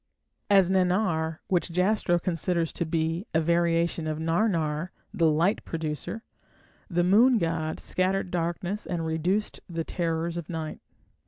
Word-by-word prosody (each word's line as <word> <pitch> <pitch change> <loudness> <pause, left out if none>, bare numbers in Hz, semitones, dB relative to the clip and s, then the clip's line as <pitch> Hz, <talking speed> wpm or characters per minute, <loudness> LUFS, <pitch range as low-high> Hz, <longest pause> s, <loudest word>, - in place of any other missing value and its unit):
As 195 -2 +5
Nannar, 180 -4 +1
which 180 -1 0
Jastrow 180 0 +2
considers 170 -1 -1
to 170 - -2
be 165 +4 -1
a - - +5
variation 170 0 +1
of 155 -1 -2
"Narnar", 165 -1 0 0.2
the 165 -2 +3
"light 170 +7 +2
producer", 160 +7 -4 0.7
the 175 -2 +1
moon 230 +7 +5
god 165 -4 -1
scattered 185 0 0
darkness 175 +4 -2
and 170 -2 -2
reduced 175 +6 -1
the 165 -1 -2
terrors 165 0 -2
of 170 - -6
night. 160 -2 -5
170 Hz, 135 wpm, -27 LUFS, 160-185 Hz, 0.7 s, As